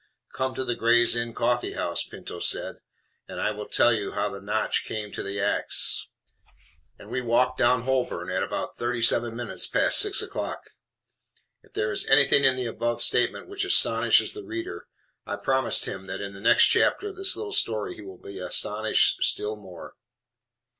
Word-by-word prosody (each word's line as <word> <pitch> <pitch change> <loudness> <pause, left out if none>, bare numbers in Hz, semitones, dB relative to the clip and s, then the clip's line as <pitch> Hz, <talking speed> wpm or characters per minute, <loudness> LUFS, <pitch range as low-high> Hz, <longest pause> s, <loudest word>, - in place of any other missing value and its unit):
"Come 130 0 -3
to 130 - -3
the 120 - -1
'Gray's 120 +1 +3
Inn 120 0 0
Coffee 120 +1 -1
House,'" - - -2
Pinto - - -10
said, - - -1 0.5
"and - - -8
I 105 - 0
will 105 0 -7
tell 120 - +3
you 105 -3 -3
how 105 0 -1
the 100 0 -9
notch 105 +2 -1
came 105 -1 -6
to - - -5
the 100 +1 -5
ax." 100 +1 +2 0.9
And - - -14
we 130 - -2
walked 125 +2 +1
down 120 -1 +2
Holborn 130 -1 -2
at - - -1
about - - -4
thirty 120 0 -2
seven 115 0 +3
minutes 115 -6 -3
past - - +3
six - - +3
o'clock. - - -4 1.0
If - - -26
there 105 0 -2
is - - 0
anything 140 0 +5
in 130 -1 +4
the 130 -1 -4
above 120 +1 -3
statement 120 - +1
which 400 +1 -4
astonishes 390 - +3
the 415 - -8
reader, 345 +1 -7 0.4
I - - -3
promise 130 -2 +2
him 95 0 -5
that 95 +1 -5
in 100 0 -6
the 100 - -12
next 120 +2 +6
chapter 415 - +2
of 395 - -11
this 380 0 +3
little 430 -1 -6
story 110 - 0
he - - -12
will 95 -2 -11
be 100 +1 -10
astonished 105 +4 0
still 105 +1 0
more. 95 -5 -12
120 Hz, 185 wpm, -25 LUFS, 105-130 Hz, 1.0 s, next